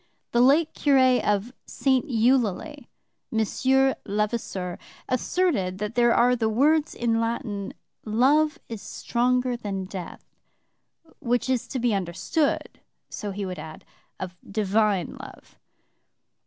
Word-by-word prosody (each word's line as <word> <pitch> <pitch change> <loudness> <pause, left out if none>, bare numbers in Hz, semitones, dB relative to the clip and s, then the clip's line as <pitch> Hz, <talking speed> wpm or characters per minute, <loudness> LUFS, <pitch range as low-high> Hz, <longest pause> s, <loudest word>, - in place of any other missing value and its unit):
The 240 - +3
late 295 +5 +4
curé 260 -3 +3
of 210 +4 0
St. 265 +2 +1
Eulalie, 250 - +1 0.4
Monsieur 265 +4 +2
Levasseur, 205 -3 -2 0.3
asserted 255 - 0
that 210 +2 -4
there 240 0 +4
are 245 +2 +4
the 225 -2 0
words 295 +7 +2
in 230 -1 +1
Latin, 225 -4 -3 0.3
Love 280 +8 +3
is 225 -3 -7
stronger 250 +1 0
than 200 -5 -4
death, 185 -2 -8 0.9
'which 245 +1 0
is 250 -3 -1
to 270 - -4
be 240 -2 +1
understood,' 195 - -1 0.3
so 210 - -5
he 200 0 -4
would 185 -1 -5
add, 155 0 -10 0.3
'of 185 -1 -6 0.2
divine 205 -3 +1
love.' - - -13
235 Hz, 120 wpm, -25 LUFS, 205-260 Hz, 0.9 s, late